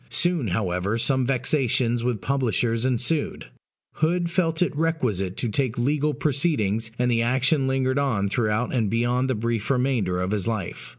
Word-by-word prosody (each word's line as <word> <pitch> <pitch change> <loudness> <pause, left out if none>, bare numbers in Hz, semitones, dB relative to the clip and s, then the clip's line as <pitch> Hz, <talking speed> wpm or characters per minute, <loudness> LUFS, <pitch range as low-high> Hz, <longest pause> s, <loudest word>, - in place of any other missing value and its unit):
Soon, 175 -8 +1
however, 95 +2 -1
some 130 +1 +1
vexations 125 -2 +1
with 120 -4 -1
publishers 120 -3 0
ensued: 130 +5 -1 0.5
Hood 170 +2 +1
felt 170 -2 +1
it 170 - -3
requisite 125 - -1
to 120 - -1
take 125 +1 -1
legal 145 +4 +1
proceedings, 120 - 0
and 125 0 +1
the 115 -1 +2
action 130 +4 +2
lingered 130 0 +1
on 115 -8 0
throughout 110 +2 0
and 115 -5 +1
beyond 120 +3 0
the 130 - +1
brief 115 0 -2
remainder 125 -9 +1
of 90 +1 -1
his 105 -4 -1
life. 110 -6 -4
125 Hz, 160 wpm, -24 LUFS, 110-140 Hz, 0.5 s, the